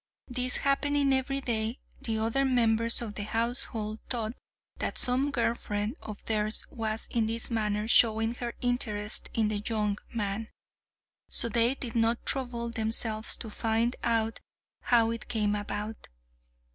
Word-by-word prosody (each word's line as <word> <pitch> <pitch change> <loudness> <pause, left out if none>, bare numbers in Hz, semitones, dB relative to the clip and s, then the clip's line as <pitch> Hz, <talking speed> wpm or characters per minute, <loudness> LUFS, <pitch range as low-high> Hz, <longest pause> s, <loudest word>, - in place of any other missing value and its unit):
This 250 0 0
happening 280 0 +2
every 275 +1 0
day, 225 0 -1 0.2
the 225 -1 -1
other 225 +5 +1
members 230 -3 +3
of 215 -3 -5
the 210 - -5
household 225 0 -1
thought 230 -3 -1 0.5
that - - -2
some 255 +3 +3
girl 255 -4 +1
friend 210 +1 -3
of 210 -2 -8
theirs 215 0 +1
was 220 -3 -3
in 225 -2 +1
this 230 +2 0
manner 210 -1 0
showing 225 0 +4
her 240 -1 -5
interest 215 -4 -1
in 220 -2 +2
the 210 -1 -1
young 210 -2 0
man, 215 0 -2 0.8
so 235 - +5
they 235 +2 +4
did 245 -4 -4
not 230 0 +2
trouble 240 -3 -1
themselves 220 -1 0
to 220 - -4
find 225 +3 0
out 225 -1 +1 0.5
how 230 -2 +4
it 230 -1 -5
came 210 -3 +1
about. 210 +1 -4
225 Hz, 145 wpm, -29 LUFS, 215-240 Hz, 0.8 s, so